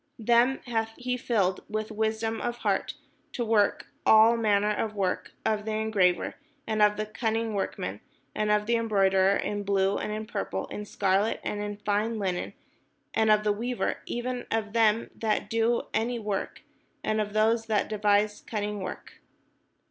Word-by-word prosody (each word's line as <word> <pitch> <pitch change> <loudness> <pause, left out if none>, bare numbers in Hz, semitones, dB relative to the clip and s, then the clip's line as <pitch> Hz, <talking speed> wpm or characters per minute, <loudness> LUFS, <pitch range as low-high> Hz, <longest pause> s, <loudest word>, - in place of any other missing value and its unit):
Them 240 +4 +3
hath 225 -2 -2
he 250 0 -2
filled 205 -7 0
with 215 0 -3
wisdom 220 +1 -1
of 240 0 -2
heart, - - 0 0.4
to 240 - -2
work 215 -2 +2 0.2
all 220 +2 +7
manner 210 -2 +2
of 215 0 -2
work, 190 -3 -2
of 215 -1 +1
the 220 0 -3
engraver, 205 -5 +1 0.3
and 215 -1 -1
of 210 0 +4
the 215 - -1
cunning 225 0 -2
workman, 105 - -3 0.3
and 215 0 -1
of 210 0 +2
the 235 +1 +2
embroiderer, 195 -3 +3
in 205 0 -2
blue, 195 0 +1
and - - -3
in 215 +1 -4
purple, - - -3
in 210 - -6
scarlet, 200 +1 +1
and 205 - -3
in 205 0 -4
fine 215 +2 0
linen, 185 -4 -2 0.6
and 220 0 +2
of 210 0 +5
the 210 -1 +2
weaver, 240 +4 -2
even 245 +1 -3
of 215 -2 -2
them 225 -1 +2
that 215 -2 -1
do 230 +1 +2
any 235 +2 0
work, 210 -3 -4 0.4
and 215 0 +1
of 205 -1 -4
those 225 +1 +2
that 215 -2 +1
devise 210 0 +1
cunning 210 -1 -3
work." 185 - -8
215 Hz, 165 wpm, -28 LUFS, 205-225 Hz, 0.6 s, all